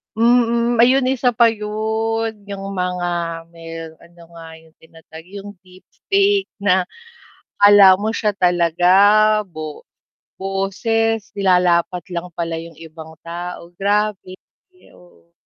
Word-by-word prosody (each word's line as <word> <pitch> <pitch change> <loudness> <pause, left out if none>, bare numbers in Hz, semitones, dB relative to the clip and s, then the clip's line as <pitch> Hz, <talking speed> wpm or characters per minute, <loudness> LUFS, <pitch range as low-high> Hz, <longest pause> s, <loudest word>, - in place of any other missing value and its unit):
Mm, 235 +1 +2
ayun 255 +2 +4
isa 250 -2 0
pa 230 0 +4
yun, 220 0 -3
yung 195 -1 -7
mga 180 -1 -2 0.4
may 165 -1 -9
ano 170 0 -20
nga 165 -1 -12
yung 160 0 -24
tinatawag, 160 0 -15
yung 200 +2 -10
deep 185 0 -18 0.2
fake 395 0 +2 0.2
na 185 -2 +2 0.8
akala 205 -2 +8
mo 215 - -1
siya 215 -2 -1
talaga, 175 -2 +1 0.6
bo 155 -4 -9 0.6
boses 205 +3 -1
nilalapat 180 -2 +1
lang 175 0 -6
pala 165 0 -4
yung 165 +1 -9
ibang 160 0 -12
tao. 175 0 -8
Grabe, 200 -2 -2 0.6
oo. 175 -1 -23
190 Hz, 115 wpm, -19 LUFS, 170-220 Hz, 0.8 s, akala